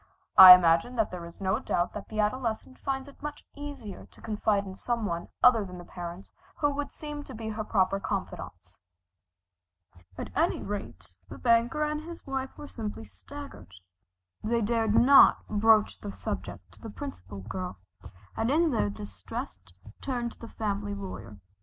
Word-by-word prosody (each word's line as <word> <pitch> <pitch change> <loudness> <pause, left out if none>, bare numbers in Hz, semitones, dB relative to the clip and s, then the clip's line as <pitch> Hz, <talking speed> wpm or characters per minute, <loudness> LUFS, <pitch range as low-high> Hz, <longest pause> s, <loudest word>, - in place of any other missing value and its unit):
I 185 -1 +13
imagine 170 +7 +2
that 220 -3 +1
there 175 -2 -6
is 170 - -14
no 195 +3 0
doubt 175 -8 -1
that 210 - -7
the 215 - -5
adolescent 230 +3 -1
finds 270 0 -3
it 280 - -15
much 295 0 -7
easier 285 -8 -8
to - - -21
confide 210 -2 0
in 190 - -7
some 235 +3 -2
one 170 -3 -3 0.2
other 235 -4 +6
than 180 -2 -9
the 175 - -10
parents 175 +2 -8 0.2
who 290 -1 +1
would 285 0 -4
seem 295 -1 -7
to 260 - -9
be 220 0 -5
her 215 0 -3
proper 195 -2 +1
confidants. - - -6 1.4
At - - -6
any - - +2
rate 90 +1 -7 0.2
the - - -8
banker 235 +5 +2
and 300 0 -1
his 335 +1 -10
wife 270 -1 -4
were 295 - -8
simply 215 - -6
staggered. 90 -2 -11 0.7
They 230 +2 +1
dared 225 0 +1
not 275 +4 +7
broach 215 0 +3
the 100 - -6
subject 95 -1 -6
to - - -20
the - - -7
Principal 95 +2 -8
Girl, 180 - -5 0.6
and 225 - 0
in 320 +3 +3
their 105 - +1
distress 100 -1 -7 0.4
turned 245 -3 -2
to - - -17
the 230 - -8
family 205 -2 -3
lawyer. 190 - -8
215 Hz, 170 wpm, -28 LUFS, 180-255 Hz, 1.4 s, I